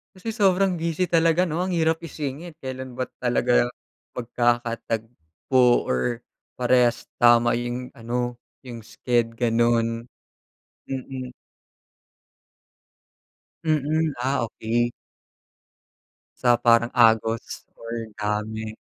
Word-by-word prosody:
Kasi 190 +5 -5
sobrang 195 -4 +2
busy 170 +2 -1
talaga, 165 +1 +4
'no, 165 -2 -1
ang 180 0 -1
hirap 160 -1 +2
isingit, 155 0 -6
kelan 130 -1 -6
ba 130 +1 -4
talaga 120 0 +2 0.5
magkakatagpo, 120 -1 0
or 115 - -1 0.3
parehas 125 -1 +2 0.2
tama 120 -1 +6
yung 120 +1 -4
ano, 120 +1 -3 0.2
yung 120 -3 -8
sched 120 -2 -1
ganon. 115 0 +1 0.8
Mm. 130 -1 -5 2.4
Mm, 155 0 +1
ah, 130 -1 0
okey. 120 +2 -1 1.5
Sa 120 -1 +4
parang 120 0 +4
agos 115 -1 +2 0.2
or 115 - -9 0.3
dami, 110 +1 -3
120 Hz, 90 wpm, -24 LUFS, 115-145 Hz, 2.4 s, tama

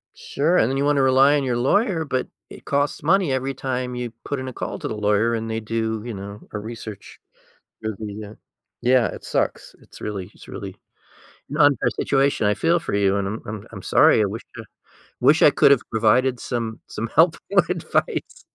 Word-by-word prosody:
Sure, 160 +6 0
and 115 - +3
then 135 - -1
you 140 - +1
wanna 145 -1 +3
rely 135 +2 +5
on 140 - -1
your 125 -2 0
lawyer, 175 - +2
but 130 -4 -2 0.2
it - - -13
costs 145 0 0
money 180 0 +2
every 130 +1 -1
time 125 -1 -3
you 125 -1 -4
put 145 - -3
in 130 - -5
a 130 - -6
call - - -5
to - - -4
the - - -4
lawyer, 105 +2 +2
and 115 0 -3
they 110 0 -2
do, 110 0 -2
you 120 - -5
know, 100 +1 -8
a 105 - -4
research 110 -1 -9 0.6
review, 105 -1 -5
yeah. 105 -1 -8 0.5
Yeah, 125 -1 +4
it - - -8
sucks. - - -2
It's - - -15
really 100 -2 -5
it's - - -16
really - - -7 0.7
an 150 - -4
unfair 145 -5 +4
situation. 135 -4 +2
I 105 - +3
feel 165 - +2
for 170 - -5
you, 100 -1 +2
and 100 -1 -1
I'm 110 +3 -4
I'm 110 -2 -7
I'm - - -8
sorry. - - +5
I - - +3
wish 105 +4 -5
a - - -5
I 110 - -21 0.4
wish 145 +6 +5
I - - +8
could've 140 -3 +5
provided 120 +3 +2
some 115 -3 -4
some 115 - -4
help 165 +1 +5
or 195 -3 +5
advice. 180 -3 -2
125 Hz, 205 wpm, -22 LUFS, 110-140 Hz, 0.7 s, I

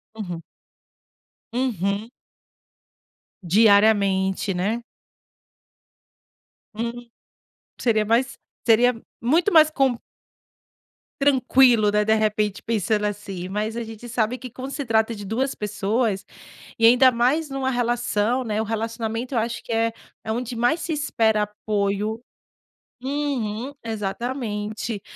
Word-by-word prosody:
Uhum. 180 -6 -5 1.1
Uhum. 215 -3 -1 1.3
Diariamente, 200 -1 +3
né? 210 +7 -1 1.9
Hum, 235 +2 -5 0.7
seria 220 -3 +2
mais 245 +5 +1 0.3
seria 245 +2 +5 0.3
muito 325 - +2
mais 310 -1 +7
com 270 -5 +2 1.3
Tranquilo, 255 -5 +4
né, 210 0 +2
de 220 +1 +3
repente 210 -2 0
pensando 215 -1 0
assim 195 -3 -4
mas 215 +4 -3
a 235 - -2
gente 225 +1 -9
sabe 230 +2 0
que 255 -1 -8
quando 260 +4 -7
se 285 - -3
trata 225 0 +1
de 205 - -8
2 250 +7 -1
pessoas 210 0 -1 0.5
e 225 - +4
ainda 250 +3 +7
mais 260 +6 +1
numa 270 -1 -1
relação, 240 -1 0
né, 215 -2 -1
o 220 - -2
relacionamento 225 +2 -3
eu 235 - +2
acho 230 +1 -3
que - - -8
é 225 0 +1 0.3
é 220 - -2
onde 245 +1 -3
mais 245 +8 +2
se 330 - -3
espera 225 -8 +1
apoio, 210 +1 -2 0.8
uhum, 265 -4 -2
exatamente. 215 -1 -3
225 Hz, 115 wpm, -23 LUFS, 210-250 Hz, 1.9 s, mais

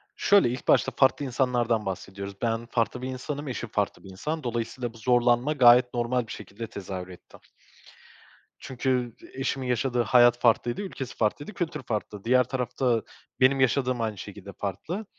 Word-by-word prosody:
Şöyle, 200 -11 +4
ilk 125 +1 -5
başta - - +4
farklı 140 +1 +3
insanlardan 120 -4 0
bahsediyoruz. 100 +1 -6
Ben 115 0 -1
farklı 120 +1 -1
bir 130 - -4
insanım, 140 +3 -5
eşim 120 -2 -4
farklı 105 -1 -2
bir 95 - -11
insan. 150 +12 -4
Dolayısıyla 120 0 -3
bu - - -14
zorlanma 120 +4 +2
gayet 125 -2 +6
normal 120 0 0
bir - - -9
şekilde 105 +3 -7
tezahür 95 -3 -6
etti. 90 -1 -14 1.2
Çünkü 125 -2 -2 0.2
eşimin 135 0 -2
yaşadığı 125 0 +1
hayat 120 +1 +5
farklıydı, 120 - +2
ülkesi 140 -10 -6
farklıydı, 145 - -1
kültür 165 -5 -3
farklı. 105 -3 -4
Diğer 125 +2 +4
tarafta 125 -1 -1 0.4
benim 135 +1 +4
yaşadığım 130 -1 +2
aynı 110 -2 -2
şekilde - - -9
farklı 155 - -4
120 Hz, 155 wpm, -26 LUFS, 115-130 Hz, 1.2 s, gayet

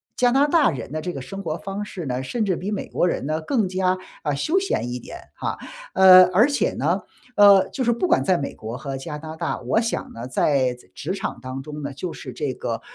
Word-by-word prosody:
加 245 -1 +3
拿 275 +3 +4
大 300 -4 +4
人 130 -6 -5
的 155 - -2
这 180 - -3
个 140 - -6
生 195 +10 -7
活 155 -1 -2
方 195 +3 -5
式 185 -5 -7
呢， 130 -1 -2
甚 220 - -1
至 190 -3 +1
比 190 +5 -4
美 205 - -3
国 - - 0
人 170 - -2
呢 155 +2 -1
更 215 - 0
加， 185 0 +1 0.2
啊， 145 - -1
休 310 - 0
闲 375 - -2
一 - - -3
点， - - -9 0.2
啊。 - - -2 0.4
呃， 185 -1 +9
而 220 +10 +5
且 280 -6 +1
呢， 170 +8 0 0.3
呃， 200 -2 +7
就 265 - -3
是 240 - +3
不 235 +10 0
管 - - +3
在 185 -2 +3
美 140 - -4
国 110 +3 -6
和 135 0 -5
加拿大， 160 +3 -5
我 130 - +1
想 230 - -3
呢， 115 +1 -7
在 130 -1 +2
仄 125 - -20
职 170 +6 -3
场 195 - -4
当 130 +1 -6
中 150 +2 -8
呢， 140 -1 -4
就 170 +5 -5
是 - - -8
这 145 -4 -3
个， 115 -2 -4
170 Hz, 265 characters per minute, -23 LUFS, 140-205 Hz, 0.4 s, 呃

